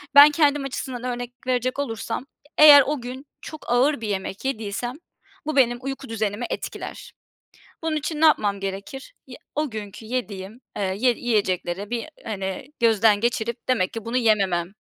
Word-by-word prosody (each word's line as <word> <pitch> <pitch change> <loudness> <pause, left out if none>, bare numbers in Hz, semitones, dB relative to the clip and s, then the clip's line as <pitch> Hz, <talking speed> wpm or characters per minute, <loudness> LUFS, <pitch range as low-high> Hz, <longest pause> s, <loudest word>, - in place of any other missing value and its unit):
ben 290 +1 +11
kendim 290 -2 +2
açısından 255 -2 -5
örnek 245 -1 -4
verecek 255 +1 0
olursam, 245 -1 -3 0.3
eğer 295 -2 +10
o 295 -4 -1
gün 255 +3 -7 0.2
çok 310 -6 -8
ağır 255 +1 +3
bir 220 - -3
yemek 195 +2 -4
yediysem 240 -1 -3 0.5
bu 310 -1 -2
benim 240 -3 +4
uyku 270 -1 -6
düzenimi 220 0 -2
etkiler. - - -6 0.7
Bunun 315 -1 0
için 300 +1 -3
ne 320 - +7
yapmam 205 -9 +3
gerekir? 200 - -6
Ye - - -10 0.2
o 300 -2 -1
günkü 215 0 -7
yediğim, 220 -2 -4 0.2
eee, - - -2 0.2
ye 250 +3 +4
yiyecekleri 200 -4 -1
bir, 240 +1 -2 0.2
hani, 195 +1 -4
gözden 220 -2 +4
geçirip 235 0 -2
demek 205 -8 +1
ki 225 -2 -6
bunu 230 +2 -2
yememem 195 -7 +2
240 Hz, 155 wpm, -24 LUFS, 205-270 Hz, 0.7 s, ben